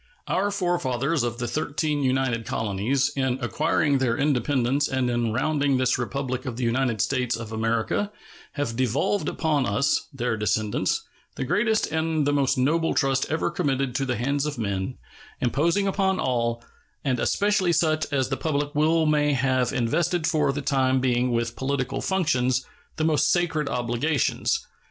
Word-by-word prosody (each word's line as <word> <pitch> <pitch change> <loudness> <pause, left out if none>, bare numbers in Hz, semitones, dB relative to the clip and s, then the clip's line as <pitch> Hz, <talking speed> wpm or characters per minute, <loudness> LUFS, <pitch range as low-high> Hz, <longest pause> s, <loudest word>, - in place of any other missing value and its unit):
Our 200 +2 +1
forefathers 165 - 0
of 120 -1 -2
the 120 0 -3
thirteen 150 +2 -1
united 130 -3 0
colonies, 115 +6 0
in 130 -2 0
acquiring 145 +2 +1
their 120 -3 +1
independence 140 0 +1
and 130 -2 0
in 120 -2 0
rounding 140 +2 +1
this 130 0 +1
Republic 130 +1 -3
of 120 -2 -4
the 125 - -2
United 120 -2 +1
States 125 -3 0
of 115 -1 -7
America, 115 - -1 0.4
have 145 -6 -2
devolved 130 - 0
upon 150 -6 0
us, 105 +8 +1
their 125 -4 -1
descendants, 105 0 0 0.3
the - - -3
greatest 220 - +1
and 160 -2 0
the 145 - +2
most 140 -1 +2
noble 165 +6 +1
trust 135 0 +1
ever 160 +3 0
committed 135 -2 -1
to 135 +2 -1
the 125 - 0
hands 140 +5 0
of 150 - -4
man, 100 +1 -3 0.4
imposing 165 +10 +1
upon 190 -1 +1
all, 120 -2 -1 0.4
and 130 -3 +1
especially 200 - +2
such 155 -2 +1
as 135 -2 0
the 135 - -1
public 145 -2 -1
will 160 +2 +3
may 150 -1 +2
have 130 -1 +1
invested 160 +8 0
for 155 -4 +2
the 140 +1 -4
time 130 -2 +2
being 125 -1 +1
with 115 0 -1
political 135 -1 -2
functions, 130 -9 +1 0.3
the 155 - -2
most 155 -2 +3
sacred 165 -4 0
obligations. 125 +5 0
135 Hz, 160 wpm, -25 LUFS, 125-155 Hz, 0.4 s, will